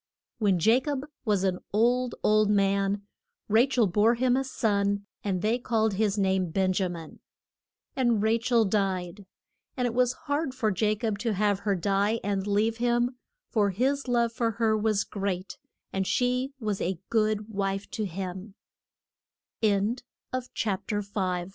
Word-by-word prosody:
] - - -57
When 200 -5 +2
Ja 225 +8 +5
cob 280 0 -3 0.2
was 205 -4 +1
an 185 -2 0
old, 245 +4 +2
old 215 0 +4
man 200 0 +2 0.4
Ra 225 +5 +4
chel 245 -4 +3
bore 210 +5 +3
him 250 +1 +2
a 270 - +1
son; 200 -5 0 0.2
and 185 -3 -1
they 225 +3 +2
called 220 -3 +1
his 210 0 0
name 190 -2 +1
Ben 185 +2 +1
ja 190 -1 +1
min. 165 -3 -9 0.8
And 240 -5 +2
Ra 220 +2 +3
chel 230 -1 +3
died. 190 -1 -1 0.5
And 250 - +1
it 240 - -1
was 250 0 +2
hard 285 -2 -1
for 220 -5 0
Ja 215 +2 +2
cob 215 -2 -2
to 230 0 0
have 205 0 +1
her 200 -1 0
die 200 +5 +1
and 200 0 -1
leave 215 +3 +1
him, 240 +1 +1 0.3
for 205 -3 +2
his 265 +8 0
love 235 -1 +1
for 230 0 0
her 220 0 +2
was 215 -1 +1
great, 195 -2 -4 0.3
and 190 -1 -1
she 250 +2 0
was 210 -4 -2
a 185 0 -1
g 215 -1 +3
215 Hz, 150 wpm, -27 LUFS, 195-240 Hz, 0.8 s, Ja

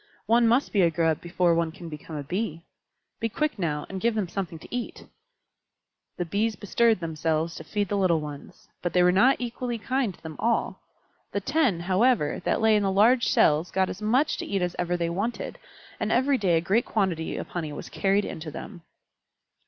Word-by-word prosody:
One 230 +2 +4
must 240 +5 +2
be 200 - +4
a 170 - +5
Grub 165 -1 0
before 175 0 +1
one 165 -1 +1
can 170 +1 -10
become 155 0 -8
a 145 - -4
Bee. 170 +1 -3 0.6
Be 225 - -1
quick 300 -1 -2
now, 150 -4 -1
and 190 -1 -6
give 235 -1 +1
them 210 -4 0
something 175 -3 -4
to 165 - -8
eat." 245 - -5 1.1
The 175 - -2
Bees 210 +6 0
bestirred 220 +2 +2
themselves 160 0 -1
to - - -8
feed 205 -1 -2
the 205 - -1
little 180 -4 +3
ones, 150 -2 -9
but 175 - -2
they 180 - +4
were 180 - +5
not 245 +9 +5
equally 240 0 -3
kind 255 0 -1
to - - -27
them 160 -1 -8
all. 235 0 0 0.5
The 200 - +1
ten, 260 - +1
however, 190 - +2
that - - +1
lay 220 -1 +5
in 210 - +3
the 195 - +1
large 230 +6 +4
cells 155 +3 +3
got 190 -1 0
as 195 - -9
much 250 +8 +2
to - - -4
eat 195 -2 0
as 175 0 -2
ever 175 0 0
they 170 -1 -1
wanted, 205 +7 -3 0.4
and - - -1
every 265 +2 +3
day 180 -4 +3
a - - +1
great 200 +8 +1
quantity 185 -7 -1
of - - -6
honey 160 -4 -4
was 145 - -7
carried 195 +1 +1
in - - -6
to 160 0 -6
them. 175 +4 -9
190 Hz, 210 wpm, -26 LUFS, 165-225 Hz, 1.1 s, a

